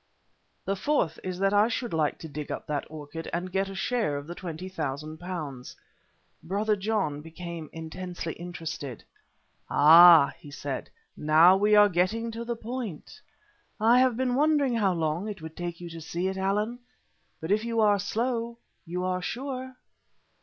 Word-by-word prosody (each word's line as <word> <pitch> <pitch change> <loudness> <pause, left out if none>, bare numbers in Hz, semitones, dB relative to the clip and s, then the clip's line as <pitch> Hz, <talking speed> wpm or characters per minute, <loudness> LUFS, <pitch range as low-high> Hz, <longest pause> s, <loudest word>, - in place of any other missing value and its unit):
"The 195 - 0
fourth 190 - 0
is 185 -1 -4
that 195 +1 +1
I 205 +2 +5
should 240 -1 -3
like 155 -2 +1
to 160 - -8
dig 150 0 -6
up - - -5
that 145 -2 -3
orchid 155 +1 -7
and 180 +2 -3
get 195 +1 0
a 195 - -7
share 215 -7 0
of 145 - -6
the 170 - -6
£20,000." 155 -4 -6 0.7
Brother 205 +6 0
John 195 -8 -1
became 165 -1 -8
intensely 165 +1 -6
interested. 165 -7 -7 0.7
"Ah!" 165 0 +8
he 145 - -12
said, 140 -2 -5 0.3
"now 160 +4 +6
we 210 +2 +4
are 205 0 +8
getting 205 +6 0
to 230 +1 -5
the 235 0 -3
point. 230 - -7 0.6
I 230 +3 +5
have 255 -3 +3
been 255 -1 0
wondering 290 -1 +3
how 205 -5 +2
long 165 +4 -1
it 205 - -6
would 160 0 -9
take 175 -1 -5
you 175 - -7
to 165 0 -8
see 170 +3 -3
it, 190 - -2
Allan, 205 +5 -1 0.6
but 160 +3 -4
if 215 +2 +2
you 230 -1 -1
are 205 -2 +4
slow, 235 +3 -2 0.3
you 180 +2 -3
are 185 0 -1
sure." 260 +4 -5
185 Hz, 165 wpm, -27 LUFS, 160-220 Hz, 0.7 s, Ah